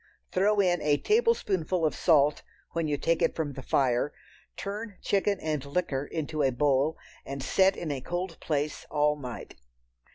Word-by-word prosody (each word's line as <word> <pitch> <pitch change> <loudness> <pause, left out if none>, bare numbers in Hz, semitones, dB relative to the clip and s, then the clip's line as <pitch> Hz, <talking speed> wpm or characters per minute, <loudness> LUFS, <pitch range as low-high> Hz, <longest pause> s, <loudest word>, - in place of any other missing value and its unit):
Throw 205 +3 +2
in 180 -3 +3
a 145 -1 +3
tablespoonful 195 - +1
of 155 - +1
salt 150 -4 +3 0.3
when 165 -1 -1
you 145 -1 0
take 165 +3 +1
it - - +2
from 150 -3 -2
the 135 - -7
fire, 130 +1 +1 0.5
turn 205 0 -5
chicken 200 0 +1
and 155 -3 -2
liquor 140 -2 -1
into 155 -1 -3
a 135 - +4
bowl 140 +3 +1 0.3
and 140 0 -6
set 190 +7 +3
in 160 - -3
a 135 -2 -3
cold 175 +3 -4
place 150 -1 -2
all 150 0 +2
night. 125 -5 -7
155 Hz, 165 wpm, -28 LUFS, 145-185 Hz, 0.5 s, a